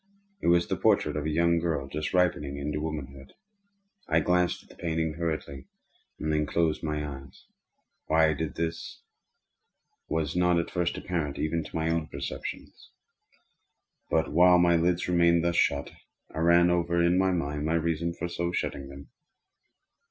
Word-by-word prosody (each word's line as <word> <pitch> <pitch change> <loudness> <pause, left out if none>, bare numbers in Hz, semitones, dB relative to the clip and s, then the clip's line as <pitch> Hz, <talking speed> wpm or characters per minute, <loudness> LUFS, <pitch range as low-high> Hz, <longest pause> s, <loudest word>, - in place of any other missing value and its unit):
It - - -2
was 85 0 +4
the - - -1
portrait - - +2
of 75 0 -2
a - - 0
young 85 +2 +2
girl 80 -5 -2
just 75 +3 -4
ripening 75 -6 +1
into 75 +1 -3
womanhood. 70 -4 -6 0.7
I - - +3
glanced 90 0 +1
at - - -25
the - - -15
painting 80 -2 -2
hurriedly, 75 -5 -4 0.5
and 75 0 -1
then 75 -1 +1
closed 80 -2 0
my 75 -2 -2
eyes. 70 -1 -11 0.6
Why 80 0 +4
I - - +1
did 80 +1 -4
this 80 0 -4 1.1
was 80 -1 -1
not 90 -1 +3
at 85 - -2
first 90 -1 -1
apparent 80 -6 -3
even 80 +1 -1
to - - -11
my 80 0 0
own 80 -2 -1
perception. - - -6 1.4
But - - +1
while 90 +3 +6
my 85 -1 +4
lids 85 +1 +1
remained 85 -1 +3
thus 85 0 0
shut, 70 0 +1 0.4
I - - -4
ran 85 +1 +5
over 85 0 +1
in 85 +1 +3
my 95 0 +3
mind 75 -5 -2
my 80 +1 +1
reason 85 0 0
for 85 - -4
so 85 0 -3
shutting 70 -5 -3
them. 70 -2 -11
80 Hz, 165 wpm, -28 LUFS, 75-85 Hz, 1.4 s, while